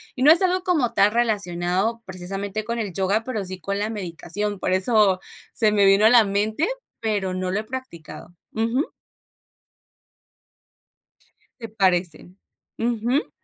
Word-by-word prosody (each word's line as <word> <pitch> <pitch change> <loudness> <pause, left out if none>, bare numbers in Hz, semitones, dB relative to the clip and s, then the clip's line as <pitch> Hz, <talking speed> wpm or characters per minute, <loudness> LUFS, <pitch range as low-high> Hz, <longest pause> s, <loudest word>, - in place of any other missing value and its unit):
Y 255 - -6
no 290 +4 +8
es 335 - +6
algo 370 0 +1
como 295 -11 +1
tal, 200 -2 +4
relacionado 205 -1 0
precisamente 195 +3 -5
con 235 +2 -3
el 210 -5 -3
yoga, 195 +5 0
pero 225 -4 -3
sí 185 0 -6
con 200 +4 -3
la 210 +1 -1
meditación, 205 0 -4
por 185 - -1
eso 190 0 +3 0.3
se 215 -3 +2
me 205 -1 +3
vino 195 +2 +5
a - - +8
la 240 -3 +7
mente. 210 - 0 0.3
Pero 205 -4 -1
no 185 0 -3
lo 195 +3 -1
he - - -11
practicado 215 -9 -9 0.2
Ujú. 230 +6 0 2.7
Se 230 - -6
parecen. 185 -3 -1 0.4
Ujú. 240 +4 0
210 Hz, 145 wpm, -23 LUFS, 185-230 Hz, 2.7 s, no